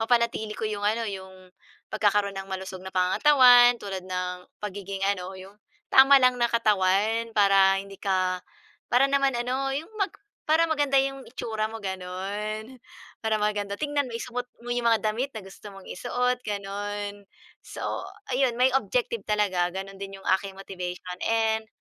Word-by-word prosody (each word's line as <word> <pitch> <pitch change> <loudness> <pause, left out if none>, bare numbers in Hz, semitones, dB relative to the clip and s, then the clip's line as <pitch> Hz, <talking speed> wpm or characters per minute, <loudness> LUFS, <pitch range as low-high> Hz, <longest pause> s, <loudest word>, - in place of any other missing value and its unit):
mapanatili 225 -2 +1
ko - - -4
yung 210 -1 -3
ano, 225 +2 +1
yung 190 -2 -8 0.4
pagkakaroon 205 -2 +2
ng 195 - -10
malusog 190 0 -5
na 190 0 -8
pangangatawan 245 +5 +6
tulad 195 -4 -5
ng 180 -1 -4 0.2
pagiging 195 -1 -4
ano, 185 0 -6
yung 190 +2 -12 0.4
tama 270 +1 +8
lang 255 -2 +4
na 235 - +3
katawan 215 +1 +2
para 195 -1 +5
hindi 195 0 -11
ka 185 -2 0 0.5
para 255 +3 +5
naman 275 -1 +2
ano 260 +3 -1
yung 310 +3 -5
mag 395 -1 0 0.4
para 315 +2 +4
maganda 290 -3 +1
yung 270 -1 -4
itsura 220 -3 -3
mo, 220 -1 -8
gano'n. 200 +5 -5 0.4
Para 220 -1 0
maganda 210 -1 -1
tignan, 290 +2 -1
maisuot 245 +1 -5 0.2
mo 240 - -7
yung 240 -1 0
mga 225 -2 +3
damit 255 +5 -3
na 215 - -6
gusto 195 +1 -12
mong 195 - -12
isuot, 250 +4 -1
gano'n. 205 0 -4 0.4
So - - -8 0.5
ayun, 255 -2 +2
may 255 +2 +4
objective 235 -3 -1
talaga. 190 -4 +1
Ganun 195 0 -6
din 195 0 -7
yung - - -14
aking 195 -1 -8
motivation 180 -1 -6
and 220 -1 +1
210 Hz, 155 wpm, -26 LUFS, 195-245 Hz, 0.5 s, tama